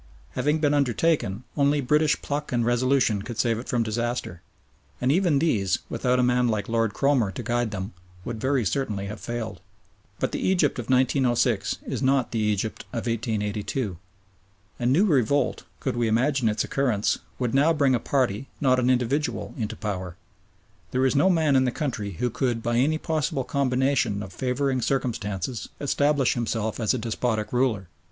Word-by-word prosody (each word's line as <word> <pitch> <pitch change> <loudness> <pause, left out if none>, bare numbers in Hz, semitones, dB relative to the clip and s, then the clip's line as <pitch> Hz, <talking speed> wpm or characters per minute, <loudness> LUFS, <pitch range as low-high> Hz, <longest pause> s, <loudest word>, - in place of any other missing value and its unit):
Having 150 +2 +1
been 145 -2 +3
undertaken, 130 - +1
only 145 0 +3
British 150 +3 +2
pluck 150 +1 -3
and 120 -2 +1
resolution 120 -3 +2
could 115 +2 -7
save 115 -1 +1
it 120 - -9
from 120 -2 +1
disaster, 115 -5 -3 0.6
and 125 +2 +2
even 170 -2 +3
these, 110 - +1
without 125 -1 +1
a 125 - +3
man 125 0 +3
like 110 -3 -1
Lord 115 -2 0
Cromer 135 -7 +2
to - - -6
guide 120 -1 0
them, 100 0 -5 0.3
would 115 -2 -5
very 130 -2 +1
certainly 105 -4 -1
have 105 +2 -6
failed. 120 -2 -5 0.6
But - - -1
the - - -3
Egypt 175 -9 +1
of 120 - -6
1906 125 -4 +2
is - - -3
not 135 -1 +2
the 115 - -1
Egypt 105 0 -1
of 115 - -4
1882. 110 -2 -2 0.8
A 120 - -2
new 155 +11 +4
revolt, 140 - +1
could - - -2
we 120 -1 +1
imagine 125 +2 +2
its 105 - 0
occurrence, 125 -7 0 0.2
would 125 -2 -1
now 145 +4 +4
bring 140 -4 +3
a 120 - +2
party, 130 -2 0
not 130 -2 +3
an 125 0 +2
individual, 130 +4 0
into 115 -4 -3
power. 95 -5 -4 0.7
There 130 +1 +1
is 130 - +2
no 145 +7 +4
man 160 -6 +3
in 130 0 +4
the 125 - +1
country 115 -8 -3
who 120 +8 -1
could 120 -2 -1
by 120 0 0
any 150 +6 +2
possible 155 -4 -1
combination 130 -5 +1
of 95 -2 -9
favouring 130 +3 -1
circumstances 115 -4 -2
establish 145 -1 +2
himself 110 -2 -2
as 110 +1 +1
a - - -1
despotic 110 -1 -2
ruler. 120 -7 +1
125 Hz, 175 wpm, -25 LUFS, 110-140 Hz, 0.8 s, new